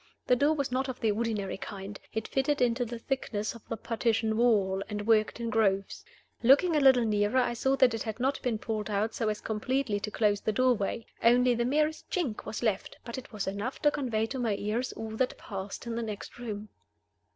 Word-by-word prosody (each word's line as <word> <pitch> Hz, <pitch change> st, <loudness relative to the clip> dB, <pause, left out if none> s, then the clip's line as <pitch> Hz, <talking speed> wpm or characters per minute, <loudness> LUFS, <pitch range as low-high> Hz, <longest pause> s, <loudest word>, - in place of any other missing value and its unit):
The 250 Hz, -, +4 dB
door 290 Hz, +5 st, +3 dB
was 280 Hz, -4 st, -2 dB
not 260 Hz, +1 st, 0 dB
of 255 Hz, -, -5 dB
the 220 Hz, -2 st, +2 dB
ordinary 210 Hz, -3 st, -2 dB
kind. 200 Hz, 0 st, -7 dB
It 220 Hz, -1 st, -3 dB
fitted 280 Hz, +2 st, +1 dB
into 245 Hz, 0 st, +2 dB
the 235 Hz, +1 st, -5 dB
thickness 225 Hz, -4 st, -2 dB
of 230 Hz, -, -12 dB
the 225 Hz, -, -2 dB
partition 225 Hz, 0 st, 0 dB
wall, 205 Hz, -5 st, +3 dB
and 205 Hz, -1 st, -4 dB
worked 220 Hz, 0 st, +3 dB
in 230 Hz, -1 st, -2 dB
grooves. 195 Hz, -3 st, +1 dB, 0.4 s
Looking 285 Hz, +8 st, +5 dB
a -, -, +5 dB
little 260 Hz, -4 st, +6 dB
nearer, 210 Hz, +2 st, +1 dB
I 245 Hz, -1 st, +2 dB
saw 265 Hz, +3 st, +1 dB
that 260 Hz, -3 st, +4 dB
it 225 Hz, -, -3 dB
had 220 Hz, 0 st, -4 dB
not 265 Hz, +3 st, 0 dB
been 245 Hz, -4 st, 0 dB
pulled 215 Hz, -1 st, -3 dB
out 210 Hz, +2 st, 0 dB
so 225 Hz, -, 0 dB
as 210 Hz, 0 st, -3 dB
completely 220 Hz, 0 st, -1 dB
to 200 Hz, -, -4 dB
close 210 Hz, -2 st, +1 dB
the 215 Hz, -, 0 dB
doorway. 235 Hz, -2 st, +1 dB, 0.2 s
Only 245 Hz, +1 st, +5 dB
the 235 Hz, 0 st, 0 dB
merest 305 Hz, +4 st, 0 dB
chink 305 Hz, -, -2 dB
was 220 Hz, -, -5 dB
left; 215 Hz, -5 st, -1 dB
but 235 Hz, +1 st, -5 dB
it 255 Hz, -, -13 dB
was 210 Hz, -3 st, -3 dB
enough 200 Hz, +7 st, -3 dB
to 295 Hz, -, +5 dB
convey 240 Hz, -7 st, 0 dB
to 260 Hz, +3 st, -5 dB
my 225 Hz, -4 st, +1 dB
ears 220 Hz, +5 st, -2 dB
all 220 Hz, 0 st, -6 dB
that 255 Hz, +1 st, 0 dB
passed 195 Hz, +1 st, -6 dB
in 235 Hz, -, -3 dB
the 235 Hz, -, -1 dB
next 215 Hz, 0 st, -6 dB
room. 215 Hz, -3 st, -5 dB
230 Hz, 220 wpm, -29 LUFS, 210-255 Hz, 0.4 s, little